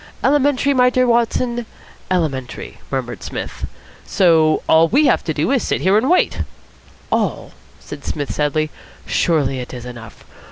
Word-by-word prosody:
"Elementary, 280 0 +3
my 250 -1 +4
dear 255 0 +2
Watson, 235 0 0 0.4
elementary," 150 -9 -3
murmured 125 -7 -4
Psmith. - - -6 0.4
"So 165 -5 +3
all 160 +1 +5
we 280 - +3
have - - +3
to 160 - -1
do 155 - 0
is 270 -3 +2
to - - -4
sit - - 0
here 190 +2 +3
and 235 +6 +2
wait." 360 - +2 0.7
"All?" - - -1 0.3
said - - -10
Psmith 145 -2 -3
sadly. 150 +1 0 0.3
"Surely 140 -6 +1
it 125 +1 -7
is 120 -1 -8
enough. 120 -3 -11
165 Hz, 155 wpm, -19 LUFS, -, 0.7 s, all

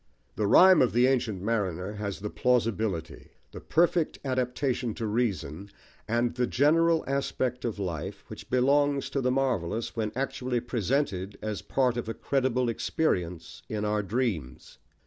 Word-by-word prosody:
The 105 - 0
Rhyme 185 - +7
of 125 - +2
the 120 +2 +4
Ancient 115 -8 0
Mariner 100 -4 -1
has 100 -2 -5
the 105 - -4
plausibility, 110 -10 -1 0.2
the - - -9
perfect 170 0 +1
adaptation 125 -2 -1
to 115 - -4
reason 100 - -2 0.4
and 120 +1 +1
the 125 0 0
general 165 +5 +3
aspect 130 -2 -2
of 115 -3 -2
life, 85 -7 -4
which - - -10
belongs 140 +2 +2
to 140 - -1
the 125 - +1
marvellous, 120 -6 -1
when 110 -2 -1
actually 130 -1 -1
presented 115 -4 -1
as 110 -2 -3
part 125 -3 0
of 115 -2 -3
a 115 - -3
credible 130 -2 0
experience 90 - -2
in 105 -1 -2
our 105 0 +1
dreams. 95 - -3
120 Hz, 145 wpm, -28 LUFS, 100-130 Hz, 0.4 s, Rhyme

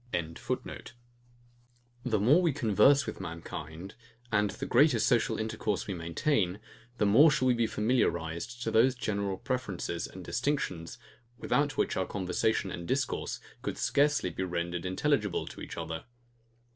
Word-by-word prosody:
] - - -27 1.9
The 115 -5 +1
more 135 - +5
we 170 -5 +2
converse 135 +2 +4
with - - -6
mankind, 85 0 -7 0.4
and 105 -1 +2
the - - -5
greater 135 +1 +4
social 115 -1 +2
intercourse 110 -2 -2
we 100 - -3
maintain, 90 - 0 0.4
the 105 - +2
more 135 +11 +7
shall 130 -3 +1
we 125 - +5
be 115 -1 +1
familiarized 105 -1 -1
to 115 - -1
these 125 +4 +4
general 100 -5 -2
preferences 100 -10 -3
and 95 -1 -10
distinctions, 120 - -2 0.4
without 145 +3 0
which - - +1
our 95 - 0
conversation 95 +1 0
and 85 0 -6
discourse 130 -1 -1 0.2
could - - -4
scarcely 145 -10 +2
be - - -5
rendered 85 0 -2
intelligible 105 -1 0
to - - -10
each - - -7
other. 80 -1 -5
105 Hz, 145 wpm, -30 LUFS, 90-130 Hz, 1.9 s, more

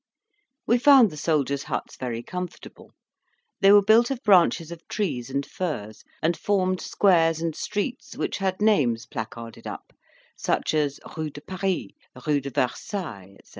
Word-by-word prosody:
We 240 +2 +3
found 260 -6 +7
the - - -9
soldiers' 145 -3 0
huts - - -4
very 120 -2 -4
comfortable; 180 +2 -8 0.7
they 195 -1 +6
were 205 0 +7
built 225 +4 +5
of 270 -1 -4
branches 175 -5 +4
of 170 -1 -10
trees 135 - -2
and 140 +1 -2
furze, 115 - -5 0.2
and 165 +2 +2
formed 185 -2 0
squares 165 -5 +3
and 165 -2 -2
streets, 240 +5 -4
which - - -2
had 190 +1 -1
names 125 - +2
placarded 115 0 -7
up, - - -8 0.4
such - - -1
as 145 -2 0 0.2
Rue 155 -1 -3
de 145 0 -11
Paris, 190 +2 -2 0.4
Rue 150 -2 +2
de 140 - -5
Versailles, 120 - -3
&c. - - -24
165 Hz, 155 wpm, -25 LUFS, 140-200 Hz, 0.7 s, found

